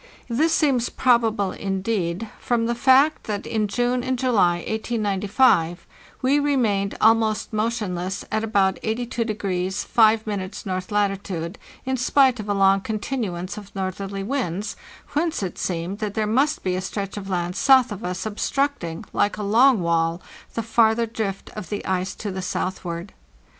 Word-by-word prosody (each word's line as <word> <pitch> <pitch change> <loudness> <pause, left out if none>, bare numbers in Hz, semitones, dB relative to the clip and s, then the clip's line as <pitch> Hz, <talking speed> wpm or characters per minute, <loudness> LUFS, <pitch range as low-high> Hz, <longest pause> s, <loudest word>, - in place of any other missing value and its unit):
This 300 +8 +2
seems 275 -7 +2
probable, 225 -6 +2
indeed, 195 0 -2
from 235 -2 0
the 235 - 0
fact 265 +5 +4
that 205 -2 -3
in 215 -2 0
June 245 +4 0
and 260 0 -1
July, 225 -9 +3
1895, 205 -4 +1 0.4
we 275 +3 +4
remained 225 -9 +1
almost 220 0 +3
motionless 200 -4 -2
at 215 +1 0
about 200 -4 +1
82° 215 -5 -2
5' 215 -3 +2
north 185 0 -3
latitude, 195 -3 -1 0.3
in 260 0 0
spite 255 0 +3
of 210 -1 -6
a - - +2
long 195 0 +4
con 220 +2 -3
tinuance 200 -7 -4
of 200 -1 -14
northerly 195 +1 -3
winds; 210 -4 -2 0.4
whence 310 -4 0
it 185 - -5
seemed 180 +3 -3
that 210 -2 -3
there 215 -1 +1
must 270 +8 +1
be 185 - 0
a 185 - -2
stretch 195 +1 -4
of 200 -2 -6
land 180 -1 -1
south 260 -2 +5
of 205 +1 -6
us 180 +3 -3
obstructing, 215 - -2
like 205 - +1
a 210 - -4
long 230 +2 +5
wall, 165 0 +1 0.4
the 230 - -1
farther 225 0 +3
drift 215 -3 -4
of 210 -4 -8
the 205 - -4
ice 185 0 -1
to 205 - -5
the 190 0 -4
south 185 0 -3
ward. 170 +2 -5
210 Hz, 160 wpm, -23 LUFS, 190-235 Hz, 0.4 s, south